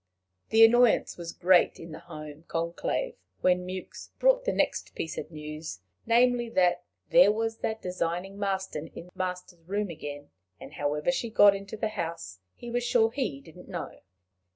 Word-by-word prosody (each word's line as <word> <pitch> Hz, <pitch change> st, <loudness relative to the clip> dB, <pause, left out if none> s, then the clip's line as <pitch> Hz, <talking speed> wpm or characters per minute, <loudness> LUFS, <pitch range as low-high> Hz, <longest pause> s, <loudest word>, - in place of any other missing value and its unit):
The 225 Hz, +1 st, +8 dB
annoyance 240 Hz, 0 st, +4 dB
was 170 Hz, -1 st, -6 dB
great 180 Hz, 0 st, +3 dB
in 165 Hz, 0 st, -9 dB
the 155 Hz, -, -8 dB
home 155 Hz, -1 st, -10 dB
conclave 170 Hz, -, -2 dB, 0.3 s
when 180 Hz, 0 st, +2 dB
Mewks 185 Hz, 0 st, -7 dB
brought -, -, +3 dB
the -, -, +2 dB
next -, -, -1 dB
piece 160 Hz, -, -4 dB
of -, -, -6 dB
news 155 Hz, -, -7 dB, 0.3 s
namely, 240 Hz, 0 st, +3 dB
that 180 Hz, -4 st, +2 dB, 0.3 s
there 255 Hz, -5 st, +7 dB
was 225 Hz, +1 st, -2 dB
that 220 Hz, 0 st, -3 dB
designing 180 Hz, +2 st, -3 dB
Marston 190 Hz, -6 st, -2 dB
in -, -, -8 dB
the 180 Hz, -, -18 dB
master's 180 Hz, -1 st, -5 dB
room 200 Hz, 0 st, -1 dB
again, 145 Hz, -2 st, -8 dB, 0.3 s
and -, -, -11 dB
however 150 Hz, -, 0 dB
she 240 Hz, -3 st, -2 dB
got 205 Hz, -2 st, +6 dB
into 200 Hz, +2 st, -7 dB
the 220 Hz, 0 st, -1 dB
house 165 Hz, -, -5 dB, 0.2 s
he 240 Hz, -, -8 dB
was 245 Hz, 0 st, 0 dB
sure 230 Hz, -2 st, +3 dB
he 235 Hz, -, -3 dB
didn't 170 Hz, +3 st, -14 dB
know. 175 Hz, -3 st, -6 dB
185 Hz, 170 wpm, -28 LUFS, 165-225 Hz, 0.3 s, The